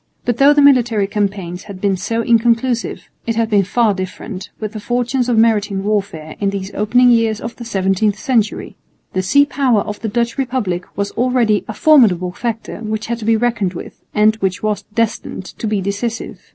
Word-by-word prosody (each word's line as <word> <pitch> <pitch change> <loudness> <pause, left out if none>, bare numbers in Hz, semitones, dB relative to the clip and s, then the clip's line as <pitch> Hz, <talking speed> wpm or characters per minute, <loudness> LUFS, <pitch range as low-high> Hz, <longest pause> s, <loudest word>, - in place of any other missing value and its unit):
But 240 -1 0
though 280 +1 +6
the 290 -1 +4
military 240 -7 +4
campaigns 195 -3 -3
had 200 -3 -9
been 195 0 +1
so 225 +5 -2
inconclusive, 235 +1 +1 0.2
it 230 - 0
had 225 0 0
been 205 -1 +5
far 220 +2 +2
different 185 +1 -6
with 215 -2 -4
the 215 - -5
fortunes 245 +3 -1
of 235 - +2
maritime 210 -3 +2
warfare 195 -7 -2
in 200 - +1
these 195 0 -5
opening 245 +4 +3
years 225 -2 +2
of 230 +1 -6
the 235 - -8
seventeenth 195 0 0
century. 230 -5 -1 0.4
The 185 - 0
sea 285 +10 +4
power 260 -6 +1
of 210 +1 -6
the 225 - -3
Dutch 235 +4 -1
republic 235 -9 -2
was 200 0 -1
already 240 -3 +1
a 215 - -5
formidable 210 - +4
factor 225 +4 -4
which 220 -1 -4
had 235 0 -3
to 215 - -6
be 225 0 +3
reckoned 220 -6 0
with - - -9
and 215 +1 +3
which 190 -2 -2
was 210 -1 0
destined 225 -4 -2
to 220 - -6
be 210 -2 0
decisive. 205 +4 -4
220 Hz, 190 wpm, -17 LUFS, 200-235 Hz, 0.4 s, though